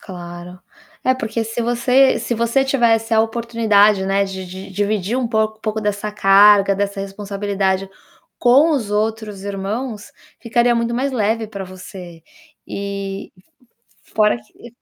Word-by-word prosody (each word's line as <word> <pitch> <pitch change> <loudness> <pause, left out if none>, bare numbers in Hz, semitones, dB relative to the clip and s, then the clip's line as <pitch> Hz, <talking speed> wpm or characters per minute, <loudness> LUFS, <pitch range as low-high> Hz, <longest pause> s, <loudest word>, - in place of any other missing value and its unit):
Claro. 175 -1 -9 0.4
É, 255 - +2
porque 225 -2 -3
se 225 +2 -4
você 250 +3 +3
se 240 - -2
você 235 +4 +1
tivesse 230 -4 +2
a 220 - +5
oportunidade, 220 -3 +2
né, 195 +1 +2
de 190 -1 -6
de 190 +2 -9
dividir 205 +3 -1
um 255 - 0
pouco 220 -1 -1
pouco 220 0 -2
dessa 210 0 -2
carga, 200 0 +5
dessa 200 0 -2
responsabilidade 195 -1 -2 0.5
com 270 +7 +5
os 235 -9 -1
outros 210 -1 -2
irmãos, 205 +3 -5 0.3
ficaria 240 +1 +2
muito 235 0 -1
mais 265 +3 -1
leve 220 -1 0
para 200 -2 -7
você. 180 -2 -11 0.4
E 200 0 -5 0.8
f - - -25
f - - -27
fora 215 +2 +3
que 220 +2 -16
210 Hz, 145 wpm, -19 LUFS, 195-230 Hz, 0.8 s, a